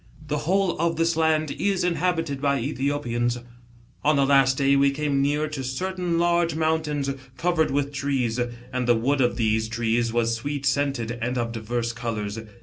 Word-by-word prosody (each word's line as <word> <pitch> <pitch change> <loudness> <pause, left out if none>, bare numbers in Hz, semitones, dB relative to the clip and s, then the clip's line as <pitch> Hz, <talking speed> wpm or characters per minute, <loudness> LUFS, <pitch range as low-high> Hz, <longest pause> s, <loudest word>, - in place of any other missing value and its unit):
The 150 0 0
whole 195 -3 +2
of 165 0 +1
this 165 0 +1
land 155 -2 +2
is 195 -2 +1
inhabited 165 -4 0
by 140 -1 +2
^Ethiopians. 120 -2 -1 0.4
" 120 +1 -29
On 150 +1 +4
the 140 -1 +3
last 135 -1 +4
day, 140 0 +3
we 140 0 +4
came 140 0 0
near 145 +2 +1
to 140 -3 -5
certain 180 +6 -2
large 170 -1 +2
mountains, 155 -3 0 0.3
covered 165 +1 +1
with 140 +1 -1
trees, 135 -4 -1 0.3
and 125 -1 -1
the 120 - +5
wood 135 +5 +1
of 120 -2 +1
these 110 -1 +1
trees 115 0 0
was 115 0 +1
sweet 140 +4 -3
scented 135 -3 0
and 125 +2 -1
of 115 -1 -1
divers 115 +1 -3
colours. 115 -3 -4
140 Hz, 175 wpm, -25 LUFS, 120-155 Hz, 0.4 s, the